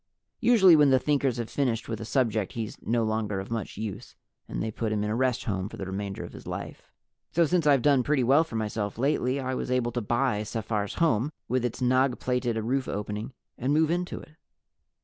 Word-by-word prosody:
Usually 220 -8 +6
when 150 -2 +6
the 130 - +5
Thinkers 135 -2 +1
have 120 -2 -3
finished 120 -5 -1
with 115 -1 -4
a - - -5
subject 110 -4 0
he's 110 -3 -4
no 115 0 0
longer 110 -2 -1
of 95 +3 -7
much 115 -5 -4
use 110 -2 -6 0.3
and - - -4
they 110 - -2
put 110 0 -2
him 105 -1 0
in 105 - -1
a - - 0
rest 130 0 +1
home 95 -4 -2
for - - -10
the 95 - -5
remainder 95 +1 -4
of - - -9
his - - -11
life. - - -7 0.4
So 170 0 +4
since 170 -1 +1
I've 140 -4 +4
done 140 -3 +5
pretty 140 +1 +1
well 140 +6 +5
for 160 - -9
myself 105 -2 -2
lately, 135 0 +1
I 130 -1 -2
was 130 - -3
able 125 -2 +1
to 120 - -2
buy 120 0 0
Sephar's 105 -2 -3
home, 145 -4 +2 0.2
with 130 0 0
its 125 +2 -2
nagh 130 +1 +3
plated 125 -2 -1
roof 125 +4 -1
opening, 105 +3 -4 0.3
and 130 +4 +1
move 160 0 +3
into 175 +1 -2
it. - - -14
120 Hz, 220 wpm, -27 LUFS, 110-135 Hz, 0.4 s, Usually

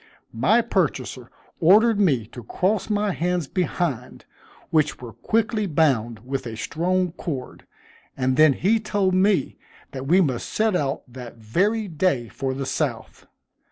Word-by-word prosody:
My 215 - +3
purchaser 135 - -2 0.3
ordered 210 +6 +5
me 140 - +2
to 120 - -9
cross 190 - -1
my 210 -1 +1
hands 175 -3 -1
behind, 165 - -3 0.5
which 155 -2 +1
were 120 -3 -9
quickly 220 -1 0
bound 120 - 0
with 135 -1 -4
a 110 -1 -6
strong 180 +7 -1
cord; 145 -7 -7 0.5
and 130 -1 +1 0.2
he 195 +5 +1
then - - -14
told 200 -3 0
me 185 -5 +2 0.3
that 135 0 -6
we 180 +5 +5
must 135 -10 0
set 220 -2 +1
out 140 -5 -1
that 125 -1 -10
very 200 - 0
day 155 - 0
for 135 -1 -3
the 135 0 -4
South. - - -4
165 Hz, 145 wpm, -23 LUFS, 130-195 Hz, 0.5 s, ordered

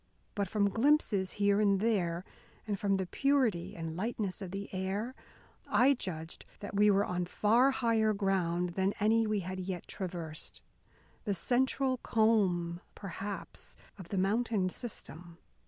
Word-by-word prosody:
But, 200 -3 -1
from 200 -1 +2
glimpses 225 -7 +2
here 200 0 +3
and 200 -2 +3
there, 185 -5 0 0.4
and 205 -3 -2
from 200 -1 +2
the 190 - -1
purity 255 -6 +1
and 165 -1 -5
lightness 205 0 -2
of 190 - -5
the 195 +2 -5
air, 195 +6 -2 0.5
I 265 +3 +5
judged 165 - -6 0.2
that 205 - -7
we 210 +1 +5
were 200 0 +4
on 180 -1 -2
far 230 +8 +4
higher 230 -4 +2
ground 185 -4 0
than 190 +3 0
any 220 +1 +3
we 210 -2 0
had 185 +1 -5
yet 185 -1 -4
traversed, 170 -5 -4 0.6
the 200 -3 0
central 260 +6 +1
comb, 190 -8 +2
perhaps, 200 +1 -6 0.2
of 175 -3 -9
the 200 - -2
mountain 200 -1 +1
system. 175 -7 -7
200 Hz, 145 wpm, -32 LUFS, 180-220 Hz, 0.6 s, I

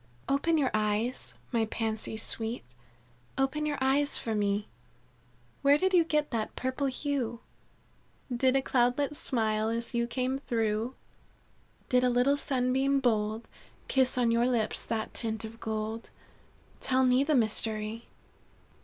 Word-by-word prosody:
"Open 300 +4 +2
your 275 -4 +2
eyes, 215 +3 -1 0.2
my 230 -3 +2
Pansies 220 0 -3
sweet, 225 +1 -2 0.7
Open 270 +3 0
your 290 -1 -1
eyes 275 +2 +2
for 225 - -3
me. 205 0 0 0.9
Where 280 +1 +5
did 375 +4 +1
you 350 -2 +6
get 300 -2 0
that 225 -3 -2
purple 260 +2 -1
hue? 260 -4 -2 1.0
Did 260 +2 +3
a 270 - +2
cloudlet 260 +4 +1
smile 220 -5 0
as 230 +2 -3
you 235 0 +1
came 255 +2 -1
through? 225 -1 -1 0.9
Did 250 0 +3
a 250 - +4
little 250 +3 +3
sunbeam 270 0 +1
bold 220 -3 0 0.4
Kiss 260 -1 +2
on 240 -2 +3
your 235 +1 +3
lips 230 -4 0
that 220 -1 -2
tint 220 -1 -3
of 225 +1 -10
gold? 220 0 -4 0.7
Tell 260 0 +2
me 255 +1 +4
the 300 +1 +2
mystery. 220 -1 0
245 Hz, 135 wpm, -29 LUFS, 220-270 Hz, 1.0 s, you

